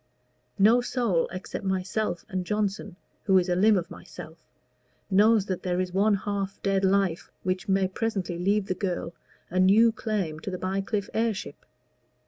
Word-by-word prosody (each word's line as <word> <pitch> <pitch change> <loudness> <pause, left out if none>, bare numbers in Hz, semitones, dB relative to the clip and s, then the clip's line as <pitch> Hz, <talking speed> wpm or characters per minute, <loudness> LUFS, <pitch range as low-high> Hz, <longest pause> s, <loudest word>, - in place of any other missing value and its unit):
No 220 +5 +5
soul 240 -8 0
except 185 +2 -6
myself 190 0 -2
and 185 -1 -3
Johnson, 205 -1 -2 0.3
who 190 -3 +5
is 180 0 +2
a 175 - +2
limb 210 +3 +4
of 175 -1 -4
myself, 160 +1 -11 0.7
knows 210 +1 +4
that 185 -3 -3
there 180 -1 -1
is 185 -1 -2
one 205 +2 +3
half 195 0 -3
dead 195 -1 +1
life 190 -3 +1
which 185 +1 -2
may 190 0 +3
presently 190 -4 -3
leave 200 +3 +1
the 185 - -1
girl 180 -2 -3 0.4
a 185 - 0
new 210 +5 +6
claim 200 -9 -3
to 175 - -6
the 185 - -4
Bycliffe 195 +2 -2
heirship. 225 -3 -2
195 Hz, 160 wpm, -26 LUFS, 185-210 Hz, 0.7 s, new